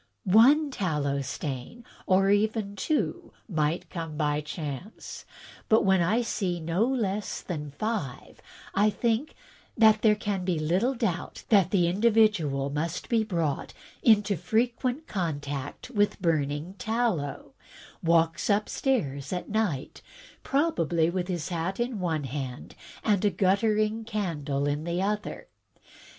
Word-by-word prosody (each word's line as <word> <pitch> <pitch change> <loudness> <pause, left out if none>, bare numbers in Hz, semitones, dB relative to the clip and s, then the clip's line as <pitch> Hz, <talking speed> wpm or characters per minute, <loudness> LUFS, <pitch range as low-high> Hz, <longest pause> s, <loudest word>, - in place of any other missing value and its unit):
" - - -49
One 270 +10 +5
tallow 150 - -1
stain, 135 - -5 0.2
or 195 +1 +4
even 205 0 +1
two, 300 +10 -2
might 160 -3 -1
come 165 -4 -5
by 150 -1 +1
chance; 150 - -7 0.4
but 220 -1 +4
when 190 -2 +4
I 215 +8 +2
see 185 -6 -2
no 170 +8 +1
less 210 -6 -2
than 150 -5 -5
five, 165 - -4 0.3
I 205 +2 +4
think 235 +6 -1 0.4
that 220 -1 +6
there 215 -2 +5
can 205 -3 -2
be 180 -2 0
little 180 - +1
doubt 195 -8 -3
that 195 -5 +5
the 180 -4 +3
individual 190 -9 +2
must 160 +3 -3
be 230 -2 +3
brought 165 -9 -2 0.3
into 210 -3 +4
frequent 245 - 0
contact 145 - -4
with 205 -3 +1
burning 155 -1 0
tallow; 220 -11 -1 0.5
walks 165 +2 +2
upstairs 200 - 0
at 180 - -3
night, 205 -11 -2 0.4
probably 170 - +1
with 180 -1 -2
his 175 -4 -3
hat 175 +3 -2
in 240 -2 -1
one 165 -5 -1
hand 135 -1 -5 0.3
and 205 -3 +2
a 205 - +4
guttering 210 +4 +1
candle 165 -11 -2
in 145 +1 -1
the 170 +1 -2
other. 205 +2 -2
190 Hz, 130 wpm, -27 LUFS, 155-220 Hz, 0.5 s, that